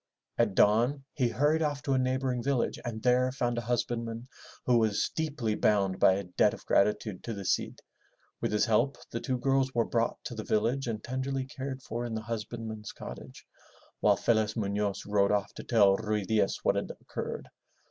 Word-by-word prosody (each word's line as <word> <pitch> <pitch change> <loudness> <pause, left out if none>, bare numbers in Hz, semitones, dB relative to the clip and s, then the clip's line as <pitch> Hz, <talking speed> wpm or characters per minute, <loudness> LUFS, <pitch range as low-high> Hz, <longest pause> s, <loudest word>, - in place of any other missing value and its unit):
At 110 -5 +2
dawn 120 +8 +3
he 130 -5 +1
hurried 150 +6 +2
off 145 -2 -1
to 140 -2 0
a 130 - +3
neighboring 130 -1 0
village 135 -1 0
and 110 -2 -5
there 125 +1 +3
found 120 -2 -1
a - - -3
husbandman 115 0 -2 0.4
who 120 -2 +4
was 110 -2 +1
deeply 145 -9 -1
bound 100 -3 +2
by 95 - +6
a 100 +1 -2
debt 90 -1 +2
of - - -16
grati 105 +1 +3
tude 105 -5 -7
to 115 - -4
the 100 -1 -6
Cid. - - -1 0.6
With - - 0
his 105 - +3
help 120 +5 +2
the 115 - -2
two 130 0 -1
girls 135 0 +1
were 115 -1 +3
brought 115 -1 0
to - - -5
the 110 -2 -5
village 115 +6 0
and 110 -2 -3
tenderly 130 +1 -2
cared 135 -1 -6
for 120 +1 -4
in 120 -2 -3
the 110 - -2
husbandman's 110 -1 -5
cottage, - - -10 0.5
while - - +4
Felez 110 -2 +1
Munoz 100 -1 -1
rode 100 -1 +2
off 105 -1 0
to - - -8
tell 100 -5 +5
Ruy 105 -2 -1
Diaz 110 -2 +1
what - - +3
had - - -2
occurred. - - -6
115 Hz, 195 wpm, -30 LUFS, 105-130 Hz, 0.6 s, by